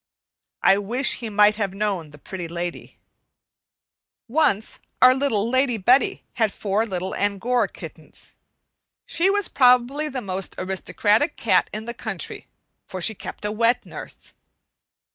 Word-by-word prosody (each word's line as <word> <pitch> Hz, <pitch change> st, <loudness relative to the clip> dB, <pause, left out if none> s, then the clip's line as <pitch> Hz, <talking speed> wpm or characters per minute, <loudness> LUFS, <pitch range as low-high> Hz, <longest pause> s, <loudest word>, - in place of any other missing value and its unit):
I 195 Hz, -, +5 dB
wish 240 Hz, +7 st, 0 dB
he 230 Hz, -3 st, -5 dB
might 210 Hz, 0 st, +4 dB
have 200 Hz, -3 st, -2 dB
known 195 Hz, -6 st, -2 dB
the 145 Hz, -, -14 dB
Pretty 175 Hz, +4 st, -7 dB
Lady. 170 Hz, +1 st, -6 dB, 1.3 s
Once 235 Hz, -6 st, +1 dB, 0.2 s
our 255 Hz, 0 st, +8 dB
Lady 255 Hz, -1 st, +1 dB
Betty 245 Hz, +7 st, +3 dB
had 220 Hz, -3 st, +1 dB
four 210 Hz, +3 st, -1 dB
little 190 Hz, -1 st, -3 dB
Angora 205 Hz, +5 st, 0 dB
kittens. -, -, -8 dB, 0.7 s
She 350 Hz, +3 st, +2 dB
was 410 Hz, -1 st, +1 dB
probably 255 Hz, +4 st, +3 dB
the 260 Hz, -, -4 dB
most 190 Hz, -3 st, -4 dB
aristocratic 205 Hz, -, 0 dB
cat -, -, +2 dB
in 215 Hz, +1 st, -5 dB
the 235 Hz, -, -5 dB
country, -, -, -5 dB, 0.4 s
for 185 Hz, -, -6 dB
she 220 Hz, +5 st, +2 dB
kept 210 Hz, -, -8 dB
a 210 Hz, -, -1 dB
wet 230 Hz, +3 st, +1 dB
nurse. -, -, -9 dB
215 Hz, 135 wpm, -23 LUFS, 195-250 Hz, 1.3 s, our